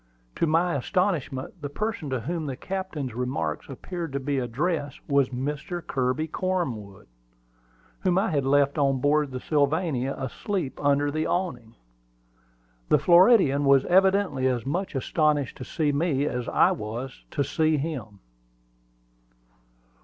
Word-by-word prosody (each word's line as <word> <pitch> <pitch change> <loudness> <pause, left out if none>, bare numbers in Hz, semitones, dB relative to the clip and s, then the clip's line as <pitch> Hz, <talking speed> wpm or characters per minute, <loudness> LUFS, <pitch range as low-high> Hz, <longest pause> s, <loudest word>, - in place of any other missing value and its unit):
To 165 - +2
my 165 +3 +2
astonishment, 150 0 -1
the 145 - -4
person 210 -1 -3
to 130 -3 -2
whom 165 +2 -3
the 135 - -3
Captain's 175 - -4
remark 115 - -3
appeared 165 +3 -6
to 140 - -1
be 140 0 -1
addressed 145 +5 -2
was 140 -2 +3
Mr. 150 +7 -4
Kirby 130 +3 0
Cornwood, 125 - -3 0.9
whom 185 -1 +1
I 195 0 +1
had 145 -3 +1
left 140 +2 +2
on 135 -1 +2
board 150 +3 +3
of 140 - -13
the 130 - -4
Sylvania, 145 -2 0
asleep 140 - -3
under 145 0 +2
the 155 +1 -1
awning. 125 -11 -3 1.1
The - - +6
Floridian 175 - +5
was 140 -1 +5
evidently 190 -7 +3
as 125 -3 -1
much 175 +5 -2
astonished 145 0 +1
to - - -7
see 150 +2 0
me 145 -1 +1
as 125 -4 -2
I - - +4
was 115 +5 -5
to 140 - -1
see 155 +2 +1
him. 130 -10 -5
145 Hz, 140 wpm, -26 LUFS, 130-170 Hz, 1.1 s, The